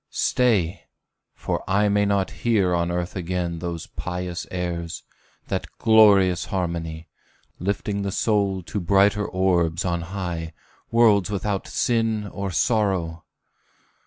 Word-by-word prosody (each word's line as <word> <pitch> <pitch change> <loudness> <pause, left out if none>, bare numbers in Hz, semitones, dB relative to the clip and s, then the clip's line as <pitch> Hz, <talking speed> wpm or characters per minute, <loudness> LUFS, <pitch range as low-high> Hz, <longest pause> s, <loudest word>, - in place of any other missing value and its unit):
Stay, 100 -8 +1 0.5
for - - -3
I 100 +2 +3
may 105 0 +2
not 100 -2 +1
hear 100 -6 +2
on 85 0 +1
earth 90 0 -3
again 90 -2 -2
Those 85 -1 -4
pious 90 -1 -5
airs 85 -2 -4 0.4
that - - -2
glorious 100 -5 +5
harmony; 85 -3 -3 0.5
Lifting 100 +2 -2
the 100 -1 -2
soul 100 -3 0
to 105 - -4
brighter 100 +3 +3
orbs 90 -2 +1
on 85 -1 -1
high, 85 -2 -5 0.4
Worlds 110 -4 +4
without 100 -1 -2
sin 115 -3 0
or 100 -1 -4
sorrow! 90 -6 0
95 Hz, 120 wpm, -23 LUFS, 85-105 Hz, 0.5 s, glorious